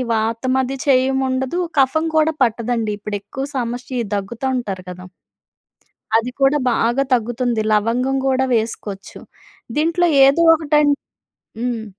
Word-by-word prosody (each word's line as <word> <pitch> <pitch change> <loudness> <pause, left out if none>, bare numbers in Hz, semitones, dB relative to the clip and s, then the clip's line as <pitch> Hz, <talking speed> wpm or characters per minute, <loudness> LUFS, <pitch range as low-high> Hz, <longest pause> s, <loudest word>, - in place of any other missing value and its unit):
వాతమ 230 +4 -1
అది 270 +2 -5
చేయము 265 0 +3
ఉండదు. 260 +6 -2 0.2
కఫం 315 +5 +2
కూడా 315 +1 +3
పట్టదండి 230 -1 -1
ఇప్పుడు 205 0 -4
ఎక్కువ 265 +7 -6
సమస్య 245 +1 -3 0.2
దగ్గుతా 230 +6 -4
ఉంటారు 195 -6 -5
కదా! 180 0 -10 1.1
అది 245 +2 -2
కూడా 270 +2 +4
బాగా 240 +3 +1
తగ్గుతుంది. 240 -1 0
లవంగం 235 +5 +1
కూడా 265 0 +2
వేసుకోవచ్చు. 210 -3 -4 0.6
దీంట్లో 335 +3 +2 0.2
ఏదో 280 +5 +4
ఒకటి 300 -1 +2
న్ 285 - +4 0.7
హ్మ్. 240 -2 -2
250 Hz, 125 wpm, -19 LUFS, 225-270 Hz, 1.1 s, కూడా